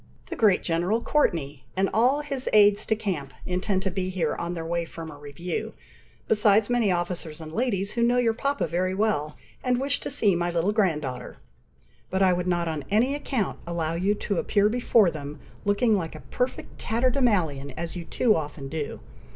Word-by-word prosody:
The -, -, -2 dB
great 210 Hz, -5 st, +3 dB
General 175 Hz, +6 st, +1 dB
Courteney, 155 Hz, -, 0 dB
and 195 Hz, +1 st, +3 dB
all 250 Hz, +7 st, +3 dB
his 275 Hz, -3 st, -3 dB
Aide 205 Hz, -1 st, +7 dB
de 220 Hz, -, +2 dB
Camps, 160 Hz, -11 st, -4 dB
intend 185 Hz, +1 st, -1 dB
to 190 Hz, -, -1 dB
be 185 Hz, 0 st, -2 dB
here 175 Hz, -5 st, -1 dB
on 170 Hz, +1 st, -4 dB
their 165 Hz, -1 st, -4 dB
way 170 Hz, +1 st, -1 dB
from 165 Hz, -1 st, -8 dB
a -, -, -10 dB
review, 145 Hz, +4 st, -5 dB, 0.5 s
besides 210 Hz, 0 st, +4 dB
many 235 Hz, -5 st, +3 dB
officers 175 Hz, -3 st, -2 dB
and 155 Hz, -1 st, -8 dB
ladies 205 Hz, -2 st, -1 dB
who 235 Hz, -, -2 dB
know 240 Hz, +1 st, +3 dB
your 235 Hz, -2 st, +3 dB
papa 265 Hz, -5 st, -1 dB
very 180 Hz, +3 st, -1 dB
well, 190 Hz, -8 st, 0 dB, 0.3 s
and 250 Hz, -1 st, +1 dB
wish 280 Hz, +1 st, 0 dB
to -, -, -5 dB
see 200 Hz, -4 st, +2 dB
my 175 Hz, 0 st, 0 dB
little 175 Hz, +3 st, +1 dB
grand 185 Hz, -8 st, +1 dB
daughter; 130 Hz, -2 st, -6 dB, 0.7 s
but 190 Hz, +1 st, +1 dB
I 185 Hz, -1 st, +5 dB
would 180 Hz, 0 st, -2 dB
not 175 Hz, -1 st, +1 dB
on 155 Hz, -3 st, -3 dB
any 230 Hz, +7 st, +3 dB
account 265 Hz, -7 st, -2 dB
allow 165 Hz, -2 st, -1 dB
you 190 Hz, +5 st, +1 dB
to 200 Hz, -2 st, -2 dB
appear 205 Hz, 0 st, +2 dB
before 230 Hz, -5 st, +3 dB
them, 145 Hz, -1 st, -7 dB, 0.3 s
looking 210 Hz, +2 st, +3 dB
like 165 Hz, -5 st, -3 dB
a 155 Hz, -, -9 dB
perfect 250 Hz, +1 st, -3 dB
tatterdemalion, 220 Hz, -, +1 dB
as 170 Hz, +1 st, -4 dB
you 175 Hz, -, -5 dB
too 225 Hz, +5 st, +2 dB
often 145 Hz, -3 st, -4 dB
do. 150 Hz, -1 st, -4 dB
185 Hz, 190 wpm, -26 LUFS, 165-220 Hz, 0.7 s, Aide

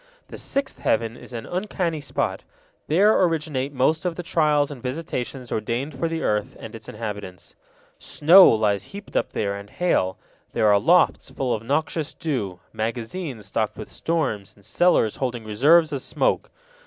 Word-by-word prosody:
The -, -, -8 dB
sixth 275 Hz, 0 st, -3 dB
heaven 115 Hz, +1 st, 0 dB
is -, -, -12 dB
an 115 Hz, -2 st, -6 dB
uncanny 180 Hz, -4 st, -2 dB
spot; 140 Hz, -, -2 dB, 0.4 s
there 200 Hz, +8 st, +4 dB
originate 155 Hz, -6 st, 0 dB
most 145 Hz, +4 st, +1 dB
of 180 Hz, -2 st, -1 dB
the 175 Hz, -, -5 dB
trials 150 Hz, -3 st, +2 dB
and 135 Hz, -4 st, -8 dB
visitations 130 Hz, -2 st, -4 dB
ordained 120 Hz, +7 st, -2 dB
for 165 Hz, -, +1 dB
the 165 Hz, 0 st, -3 dB
earth 105 Hz, -1 st, -1 dB
and 110 Hz, -, -9 dB
its 115 Hz, -1 st, -10 dB
inhabitants. 105 Hz, -5 st, -7 dB, 0.4 s
Snow 180 Hz, +6 st, +7 dB
lies 105 Hz, -3 st, +2 dB
heaped 200 Hz, +1 st, -11 dB
up -, -, 0 dB
there 100 Hz, -1 st, -1 dB
and 100 Hz, 0 st, -9 dB
hail; 100 Hz, -, 0 dB, 0.4 s
there -, -, +1 dB
are 100 Hz, -1 st, +5 dB
lofts 175 Hz, -, +3 dB
full 130 Hz, -2 st, -2 dB
of 110 Hz, -, -2 dB
noxious 150 Hz, +4 st, -1 dB
dew, 105 Hz, -, -3 dB
magazines 115 Hz, -, -4 dB
stocked 110 Hz, +1 st, -2 dB
with 110 Hz, -, -8 dB
storms, 140 Hz, -, -2 dB
and 100 Hz, -, -19 dB
cellars 175 Hz, -, +2 dB
holding 125 Hz, -3 st, -3 dB
reserves 150 Hz, +10 st, +4 dB
of 140 Hz, -3 st, -2 dB
smoke. -, -, 0 dB
130 Hz, 165 wpm, -23 LUFS, 110-165 Hz, 0.4 s, Snow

